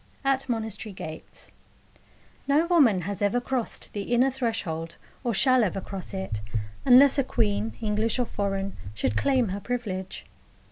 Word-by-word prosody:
AT 270 -1 +1
MONASTERY 220 -2 -3
GATES 160 -3 -9 1.0
No 290 +4 +4
woman 280 - +4
has 200 +3 -5
ever 205 +4 +2
crossed 250 -1 -3
the 205 - -3
inner 260 +3 +4
threshold, 220 -11 -3 0.3
or 240 - 0
shall 255 +3 +4
ever 195 -1 -1
cross 195 0 -7
it, 190 - -4 0.5
unless 270 +2 +7
a - - +4
queen, 105 - 0
English 215 +2 +1
or 250 - +1
foreign, 195 -2 -2 0.2
should 105 +2 -1
claim 260 - +2
her 195 +2 -3
privilege. 200 -6 -4
220 Hz, 145 wpm, -26 LUFS, 190-255 Hz, 1.0 s, unless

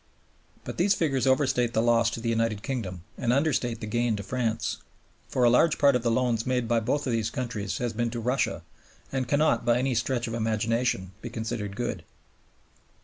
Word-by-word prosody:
But - - -7
these 195 +3 +4
figures 135 -5 0
overstate 130 -3 +2
the 110 - +2
loss 115 -1 +4
to 115 - -5
the 115 0 -2
United 115 -2 0
Kingdom 95 - -4 0.2
and 120 - +1
understate 125 -4 +1
the - - -3
gain 120 +1 0
to 100 - -5
France; 115 0 -1 0.5
for 125 - 0
a 120 - +7
large 155 +6 +4
part 140 -2 +5
of 125 - +1
the 115 - +1
loans 115 -1 +1
made 125 -2 0
by 115 0 +2
both 130 +7 -1
these 115 -4 0
countries 110 -6 -3
has 120 -2 -2
been 120 +1 -1
to 120 0 -4
Russia 125 +4 0 0.5
and 130 -2 -1
cannot, 150 +1 +2
by 120 0 +3
any 130 +1 0
stretch 120 +1 0
of 115 - -4
imagination, 115 -3 0
be 120 - -6
considered 110 -3 -4
good. 120 +2 -3
120 Hz, 195 wpm, -27 LUFS, 115-130 Hz, 0.5 s, a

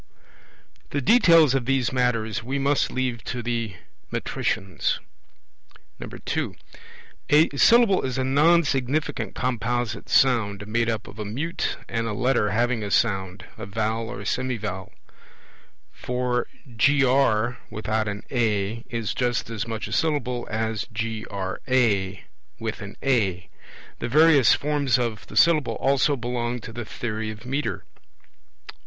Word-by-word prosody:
The 145 - -1
details 165 - +5
of 135 -3 0
these 130 -1 +1
matters 115 -4 0
we 130 +4 -3
must 140 +1 +1
leave 125 -3 -2
to 120 -1 -4
the 115 -4 -2 0.4
metricians. 95 -1 -1 1.0
(2) - - -4 0.7
A 150 +2 +5
Syllable 230 - +5
is 130 -1 -3
a 130 - +1
nonsignificant 145 0 +1
composite 120 -2 -2
sound, 105 -6 +2
made 115 +2 0
up 110 -1 -3
of 105 - -12
a - - -2
mute 135 +12 -3
and 115 0 -2
a 110 - -2
Letter 125 -3 +1
having 115 +2 +1
a 105 - -4
sound 95 -4 0
(a - - -6
vowel 110 +2 -2
or 125 - -6
semivowel); 110 -7 -3 1.0
for 125 0 -2 0.2
GR, 125 -2 +2
without 110 0 -2
an 100 0 -4
A, 110 -2 0
is 115 -4 -2
just 120 -2 -1
as 115 0 -3
much 110 -2 -4
a - - -10
Syllable 125 -3 -1
as 110 0 -2
GRA, 110 -1 -1 0.4
with 110 -1 -5
an 100 0 -8
A. 100 -10 +1 0.5
The - - -3
various 150 -3 +6
forms 145 -4 +1
of 115 -5 -3
the - - -8
Syllable 165 -3 +4
also 140 +2 +2
belong 120 -1 -3
to 115 -1 -9
the 120 0 -5
theory 110 -1 -4
of 110 +2 -9
metre. 140 +3 -2
120 Hz, 130 wpm, -24 LUFS, 110-135 Hz, 1.0 s, various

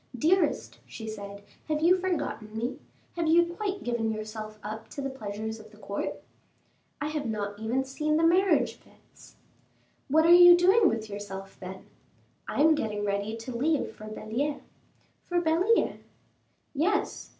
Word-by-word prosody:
"Dearest," 355 +9 +1
she 220 - -8
said, 200 -2 -7 0.2
"have 305 -1 0
you 345 +3 +6
forgotten 335 -12 -3
me? 240 +3 -3 0.4
Have 335 -2 -1
you 340 +2 +5
quite 395 +1 -3
given 235 -2 -1
yourself 215 0 -6
up 215 +2 -7
to - - -9
the 275 -1 -3
pleasures 220 -2 -5
of 215 0 -13
the 210 - -18
court?" 200 -1 -5 0.8
"I 295 0 -2
have 300 -3 -3
not 205 -2 -3
even 235 +4 0
seen 305 +3 -1
the 325 - +2
marriage 365 +3 +3
fetes." - - -21 0.7
"What 315 +3 +4
are 340 - +8
you 350 0 +9
doing 380 +3 +5
with 220 -1 -3
yourself, 195 -2 -7
then?" 190 0 -8 0.6
"I - - -1
am 320 +1 +6
getting 210 -8 -2
ready 200 +2 -2
to 235 +2 -7
leave 295 +3 0
for 215 - -10
Belliere." 230 +7 -3 0.6
"For 350 -1 -1
Belliere?" 350 +7 +2 0.7
"Yes." 365 +8 -1
250 Hz, 155 wpm, -28 LUFS, 215-330 Hz, 0.8 s, you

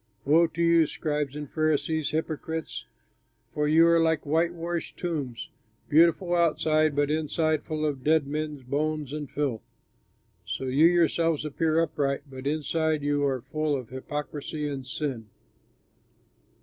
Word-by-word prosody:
"Woe 165 +4 +5
to 170 +1 -2
you, 165 -2 +5
scribes 150 -3 -2
and 150 -1 -5
Pharisees, 155 0 0
hypocrites! 160 0 -4 0.7
For 150 0 0
you 160 +2 +6
are 170 0 +5
like 160 -2 +1
whitewashed 170 +2 -1
tombs, 145 -9 -4 0.4
beautiful 170 +3 +4
outside, 155 -2 +2
but 145 0 +1
inside 155 0 0
full 155 -1 -3
of 140 -4 -2
dead 155 -1 +3
men's 150 -1 -4
bones 150 +2 -2
and 150 -3 -5
filth. 135 -7 -2 0.8
So - - -4
you 135 +5 +4
yourselves 165 -2 +2
appear 160 +2 +1
upright, 140 -4 0
but 130 0 -7
inside 155 0 0
you 145 0 +1
are 130 -2 -1
full 155 +2 -1
of 130 -4 -6
hypocrisy 150 +3 -5
and 135 -3 -5
sin." 135 -6 -4
155 Hz, 135 wpm, -27 LUFS, 145-160 Hz, 0.8 s, you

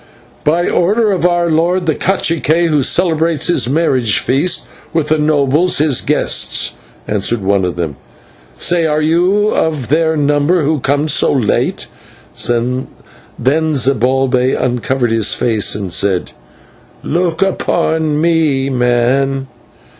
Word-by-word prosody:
"By 170 +4 +1
order 210 +5 +1
of 180 -2 +1
our 175 -1 0
lord, 175 +3 +1
the 160 - +1
/cacique/, 170 -2 0
who 150 -2 +2
celebrates 165 +1 +1
his 175 -8 +1
marriage 130 -7 +1
feast 145 +8 0 0.3
with 160 -2 -1
the 155 0 +1
nobles 150 +3 +2
his 150 -4 +2
guests," - - 0 0.3
answered 105 +2 -1
one 100 0 +1
of 90 -1 -2
them. 80 -5 -4 0.6
"Say, 170 - +1
are 155 0 0
you 180 +6 +2
of 150 - -1
their 160 +1 +1
number 145 +4 +1
who 150 +1 0
come 145 +4 0
so 150 - +2
late?" 125 -7 -1 0.6
Then 120 +2 -1 0.6
Zibalbay 135 -3 +1
uncovered 125 0 -1
his 110 -2 +1
face 110 -5 0
and 95 -4 -5
said: 95 -1 0 0.7
"Look 170 +2 0
at 170 -4 -1
me, 155 -3 0
man. 130 +2 0
150 Hz, 125 wpm, -14 LUFS, 125-165 Hz, 0.7 s, who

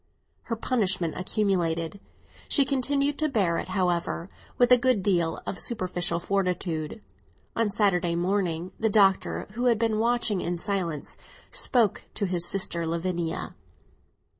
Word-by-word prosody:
Her 230 - -2
punishment 195 -8 0
accumulated; 180 -2 -1 0.5
she 280 - +5
continued 275 +2 0
to 310 0 +1
bear 190 -10 +1
it, - - -5
however, 180 -1 -1 0.3
with 245 0 +4
a 250 - +9
good 245 -5 +2
deal 170 -5 +1
of 190 - -4
superficial 180 -6 0
fortitude. 180 -1 -2 0.5
On 225 -2 +1
Saturday 185 -4 +1
morning 180 -1 -1
the 220 - +2
Doctor, 195 -2 +3
who 240 +4 -3
had 235 -2 +4
been 220 -1 0
watching 230 -4 +2
in 175 0 -2
silence, 175 -5 -2 0.3
spoke 235 -6 +2
to 205 - 0
his 175 -2 0
sister 170 -4 -2
Lavinia. 170 0 -2
190 Hz, 135 wpm, -27 LUFS, 175-225 Hz, 0.5 s, a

